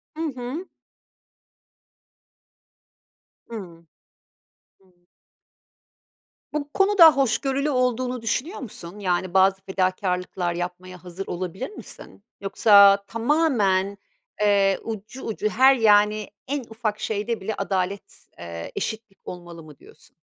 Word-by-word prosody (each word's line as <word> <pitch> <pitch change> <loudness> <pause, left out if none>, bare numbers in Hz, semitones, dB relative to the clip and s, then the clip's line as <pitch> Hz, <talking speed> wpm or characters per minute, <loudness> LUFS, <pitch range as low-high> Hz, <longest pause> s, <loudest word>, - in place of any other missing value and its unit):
Hı 320 - -5
hı. 255 +9 -6 2.8
Hıı. 175 -7 -9 0.9
Hı. 190 -1 -28 1.6
Bu 295 -1 -3
konuda 390 -5 +7
hoşgörülü 275 +2 +1
olduğunu 250 -2 0
düşünüyor 255 - -2
musun? 205 -6 -9
Yani, 180 -1 -1
bazı 190 0 +4
fedakârlıklar 185 -2 -1
yapmaya 180 +1 -6
hazır 180 +2 -7
olabilir 185 +7 -5
misin? 205 - -12 0.2
Yoksa 200 0 +6
tamamen, 225 -7 +1 0.4
eee, 200 -2 +3
ucu 220 +3 -7
ucu 215 -1 -2
her 265 +4 +5
yani, 210 -2 +3 0.2
en 280 0 -2
ufak 220 -1 -3
şeyde 220 +1 -2
bile 215 +3 -3
adalet, 195 0 -3
eee, 85 -1 -7
eşitlik 220 -3 -5
olmalı 175 -2 -9
mı 150 -3 -14
diyorsun? - - -20
205 Hz, 100 wpm, -24 LUFS, 185-245 Hz, 2.8 s, konuda